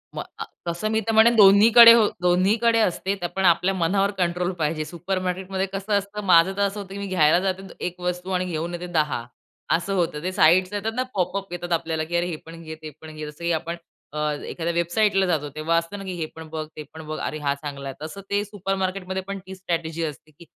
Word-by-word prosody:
मग -, -, -3 dB, 0.2 s
आ -, -, -3 dB, 0.2 s
तसं 170 Hz, +5 st, -2 dB
मी 220 Hz, -, +2 dB
तर -, -, +2 dB
म्हणेन 225 Hz, +2 st, +6 dB
दोन्हीकडे 225 Hz, +3 st, +9 dB, 0.3 s
दोन्हीकडे 205 Hz, +6 st, +3 dB
असते. 195 Hz, -1 st, 0 dB
तर 185 Hz, -3 st, -5 dB
आपण 190 Hz, +2 st, -2 dB
आपल्या 180 Hz, +2 st, +4 dB
मनावर 195 Hz, +3 st, +1 dB
कंट्रोल 180 Hz, 0 st, 0 dB
पाहिजे. 155 Hz, 0 st, -1 dB
सुपरमार्केटमध्ये 185 Hz, +2 st, -3 dB
कसं 195 Hz, +2 st, -3 dB
असतं, 200 Hz, +1 st, -4 dB
माझं 175 Hz, 0 st, +6 dB
तर -, -, 0 dB
असं 200 Hz, +1 st, 0 dB
होतं 195 Hz, -1 st, -8 dB
की -, -, -6 dB
मी 200 Hz, -, -4 dB
घ्यायला 175 Hz, -3 st, +4 dB
जाते 190 Hz, 0 st, -2 dB
द -, -, -12 dB, 0.2 s
1 180 Hz, +1 st, -21 dB
वस्तू 180 Hz, +1 st, -3 dB
आणि 185 Hz, 0 st, 0 dB
घेऊन 170 Hz, 0 st, -3 dB
येते 175 Hz, +1 st, -5 dB
10 145 Hz, -6 st, 0 dB, 0.5 s
असं 175 Hz, +4 st, -2 dB
होतं. 165 Hz, -4 st, -1 dB
ते 185 Hz, -, -1 dB
साइट्स 185 Hz, +3 st, +4 dB
येतात 205 Hz, +2 st, -2 dB
ना, 255 Hz, -, +1 dB
पॉपअप 195 Hz, 0 st, -2 dB
येतात 175 Hz, 0 st, -5 dB
आपल्याला 160 Hz, -1 st, -1 dB
की 170 Hz, +2 st, -4 dB
अरे 175 Hz, -, +1 dB
हे 175 Hz, -, -3 dB
पण 165 Hz, +1 st, -11 dB
घे, 160 Hz, -1 st, -8 dB
ते 155 Hz, -, -7 dB
पण 155 Hz, -1 st, -10 dB
घे, 155 Hz, 0 st, -6 dB
जस 150 Hz, -, -23 dB
की 170 Hz, 0 st, -1 dB
अ, -, -, +2 dB
आपण 165 Hz, +2 st, -4 dB, 0.7 s
एखाद्या 170 Hz, 0 st, -3 dB
वेबसाईटला 190 Hz, +4 st, +2 dB
जातो 155 Hz, -5 st, -1 dB
तेव्हा, 165 Hz, +2 st, +1 dB, 0.3 s
हे 175 Hz, -4 st, -3 dB
पण 160 Hz, 0 st, -9 dB
बघ, 155 Hz, 0 st, -4 dB
ते 155 Hz, -, -6 dB
पण 160 Hz, -, -9 dB
बघ, 155 Hz, -, -4 dB
अरे 155 Hz, -, -3 dB
हा 140 Hz, -1 st, 0 dB
चांगला 140 Hz, -1 st, -7 dB
आहे 135 Hz, -, -7 dB
तसं 200 Hz, +5 st, -8 dB
ते 205 Hz, 0 st, +1 dB
सुपर 195 Hz, -2 st, -3 dB
मार्केटमध्ये 190 Hz, 0 st, -3 dB
पण 200 Hz, 0 st, -4 dB
ती 190 Hz, 0 st, -8 dB
स्ट्रॅटेजी 170 Hz, -3 st, -3 dB
असते 155 Hz, 0 st, -6 dB
की 170 Hz, +4 st, -16 dB
180 Hz, 225 wpm, -24 LUFS, 165-195 Hz, 0.7 s, दोन्हीकडे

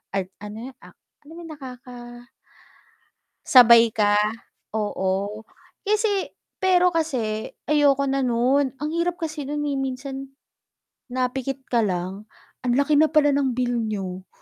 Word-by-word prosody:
an 195 Hz, -1 st, 0 dB
ano 210 Hz, +1 st, -8 dB, 0.2 s
'yun, -, -, -29 dB
ak -, -, -16 dB, 0.3 s
ano 295 Hz, -, -16 dB
ba -, -, -9 dB
yung 325 Hz, -, -9 dB
nakaka 255 Hz, -4 st, -10 dB, 1.5 s
sabay 235 Hz, -2 st, +8 dB
ka, 205 Hz, -1 st, +3 dB, 0.6 s
oo, 205 Hz, 0 st, -2 dB, 0.4 s
kasi 420 Hz, -2 st, +1 dB, 0.3 s
pero 360 Hz, -1 st, +4 dB
kasi 250 Hz, -10 st, -1 dB, 0.2 s
ayoko 285 Hz, -2 st, +4 dB
na 275 Hz, 0 st, 0 dB
nun, 260 Hz, +2 st, +1 dB
ang 300 Hz, -, -2 dB
hirap 340 Hz, +1 st, 0 dB
kasi 310 Hz, -4 st, -5 dB
nun, 295 Hz, +1 st, -2 dB
eh, 285 Hz, -2 st, -1 dB
minsan 270 Hz, +1 st, -4 dB, 0.8 s
napikit 260 Hz, +1 st, -3 dB
ka 240 Hz, -, +3 dB
lang, 195 Hz, 0 st, -2 dB, 0.3 s
anlaki 280 Hz, +4 st, +2 dB
na 315 Hz, -, +6 dB
pala 300 Hz, -2 st, +3 dB
ng 275 Hz, -3 st, +1 dB
bill 245 Hz, -1 st, 0 dB
niyo, 190 Hz, -4 st, -4 dB
260 Hz, 135 wpm, -23 LUFS, 220-295 Hz, 1.5 s, sabay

